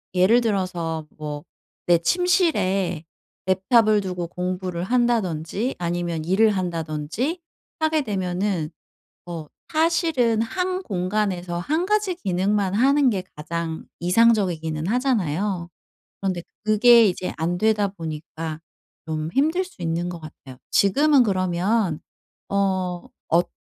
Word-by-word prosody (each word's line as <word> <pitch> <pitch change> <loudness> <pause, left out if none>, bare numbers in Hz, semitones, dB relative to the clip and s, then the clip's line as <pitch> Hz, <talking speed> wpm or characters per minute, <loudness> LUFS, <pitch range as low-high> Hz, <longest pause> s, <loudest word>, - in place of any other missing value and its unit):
예를 210 +7 +5
들어서 175 -7 -2
뭐 150 -1 -5 0.4
내 175 - +6
침실에 195 - +1 0.4
랩탑을 210 +2 +3
두고 180 -2 -3
공부를 180 0 -3
한다든지 225 - 0
아니면 170 -2 -2
일을 205 +6 +3
한다든지 175 - -2 0.4
하게 315 -1 +2
되면은 185 -5 -1 0.6
어 165 -3 -6 0.3
사실은 310 -8 +2
1 370 +9 -2
공간에서 185 - -2
1 315 - -1
가지 420 -3 +1
기능만 195 - 0
하는 275 +4 +4
게 195 -5 0
가장 160 +1 -4
이상적이기는 175 -5 +2
하잖아요. 195 - 0 0.5
그런데 185 -3 -2 0.2
그게 225 +2 +6
이제 180 0 -3
안 170 +2 0
되다 210 0 +2
보니까 160 -2 -6 0.5
좀 155 0 -3
힘들 320 +7 +2
수 360 - -17
있는 170 +1 -1
것 170 -2 -7
같아요. 135 -4 -12
지금은 280 +7 +4
그러면 185 -2 0 0.5
어 190 -3 -1 0.2
엇 175 +2 +3
185 Hz, 240 characters per minute, -23 LUFS, 170-230 Hz, 0.6 s, 내